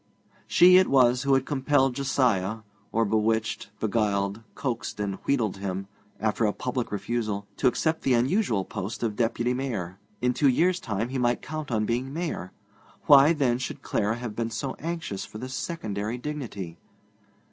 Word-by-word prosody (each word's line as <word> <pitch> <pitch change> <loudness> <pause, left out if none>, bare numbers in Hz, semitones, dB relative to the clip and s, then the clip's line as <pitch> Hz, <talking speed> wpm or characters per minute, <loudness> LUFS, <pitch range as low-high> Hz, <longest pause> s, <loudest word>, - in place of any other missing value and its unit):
She 180 +1 +7
it 185 - +5
was 125 -2 +4
who 140 0 +3
had 135 0 +1
compelled 135 -2 +2
Josiah 120 -6 +1 0.3
(or 115 +1 +2
bewitched, 110 0 0
beguiled, 105 -1 0
coaxed 120 -5 -3
and 100 -2 -2
wheedled 115 -8 +1
him), 95 0 -4 0.3
after 110 +1 +1
a 105 - +1
public 125 -1 -3
refusal, 105 0 -2
to 130 - +3
accept 160 +5 +1
the 130 - +3
unusual 120 - +1
post 100 +5 -5
of 110 -3 -1
Deputy 120 +2 0
Mayor. 105 -9 -3 0.2
In 125 0 +1
two 140 +2 +3
years' 175 +8 +2
time 110 - -2
he 130 0 -2
might 120 -1 +1
count 155 0 -5
on 110 -3 +1
being 125 +4 -1
Mayor. 155 - -4 0.5
Why, 145 +1 +8
then, 130 -6 +1
should 130 - -5
Clara 105 +2 0
have 120 -3 -6
been 115 0 -1
so 130 +4 -3
anxious 160 - -4
for - - -9
this 130 +3 -6
secondary 110 - -3
dignity? 120 - -6
120 Hz, 165 wpm, -26 LUFS, 105-135 Hz, 0.5 s, Why